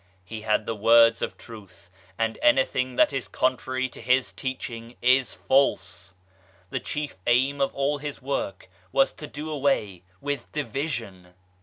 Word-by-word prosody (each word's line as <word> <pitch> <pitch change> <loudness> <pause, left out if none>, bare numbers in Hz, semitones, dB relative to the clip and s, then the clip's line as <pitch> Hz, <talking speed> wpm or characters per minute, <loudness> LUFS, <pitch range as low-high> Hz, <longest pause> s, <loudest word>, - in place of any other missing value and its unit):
He 110 +4 -7
had 105 0 +1
the 115 - -2
words 115 +2 +5
of - - -3
Truth, 110 -5 -13 0.3
and 115 0 -1
anything 130 0 +2
that 135 - +4
is 135 -2 -2
contrary 130 0 0
to - - -12
his 125 +2 +2
teaching 120 -3 -5
is 130 +1 +3
false. 135 -9 +1 0.6
The - - -1
chief 150 -5 -4
aim 135 +4 +3
of 135 - +2
all 140 +1 0
his 145 0 -5
work 130 -8 -3 0.2
was 135 - +3
to 150 - -8
do 150 +2 -6
away 135 - 0 0.2
with 145 0 -4
division. 120 - -4
130 Hz, 150 wpm, -26 LUFS, 115-140 Hz, 0.6 s, words